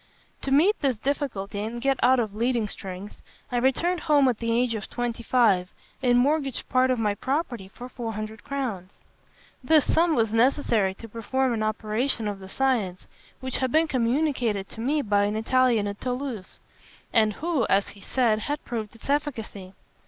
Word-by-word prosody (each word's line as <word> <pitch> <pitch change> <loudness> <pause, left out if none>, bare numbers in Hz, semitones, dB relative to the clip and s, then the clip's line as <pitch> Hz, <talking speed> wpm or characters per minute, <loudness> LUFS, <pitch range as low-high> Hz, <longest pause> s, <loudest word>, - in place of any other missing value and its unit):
"To - - -3
meet 340 +10 +4
this 265 -6 +1
difficulty 220 -7 -3
and 225 +3 -4
get 270 +1 +1
out 255 +1 +5
of 215 -4 -1
leading 235 0 0
strings, 195 0 -8 0.3
I 245 - 0
returned 300 +9 +1
home 290 -4 +4
at 240 - -2
the 230 0 -1
age 240 0 +2
of 215 -2 -5
twenty 240 -1 -3
five, 220 -7 +3 0.3
and 245 -2 +4
mortgaged 275 0 +1
part 255 0 +3
of 255 - +2
my 210 -2 +1
property 255 - -2
for 240 +5 -10
four 235 -3 -5
hundred 215 0 -6
crowns. 225 -10 -5 0.6
This 305 +1 +4
sum 330 -1 +3
was 225 -3 +1
necessary 225 -5 +2
to 230 - -10
perform 240 +4 -1
an 220 - -2
operation 215 +2 -1
of 205 -1 -4
the 190 0 -10
science, 220 -8 0 0.4
which 260 -1 -3
had 260 -2 -1
been 320 +1 +3
communicated 245 -5 0
to 225 - -8
me 290 +4 +1
by 205 -1 +2
an 205 +1 -1
Italian 235 -1 +2
at 200 0 -6
Toulouse, 250 -6 -4 0.5
and 215 -2 +4
who, 310 - -1
as 195 +1 +2
he 200 - -13
said, 230 -1 +1
had 290 +7 -3
proved 225 -2 -5
its 230 - -13
efficacy. 230 -10 -3
240 Hz, 180 wpm, -26 LUFS, 215-265 Hz, 0.6 s, out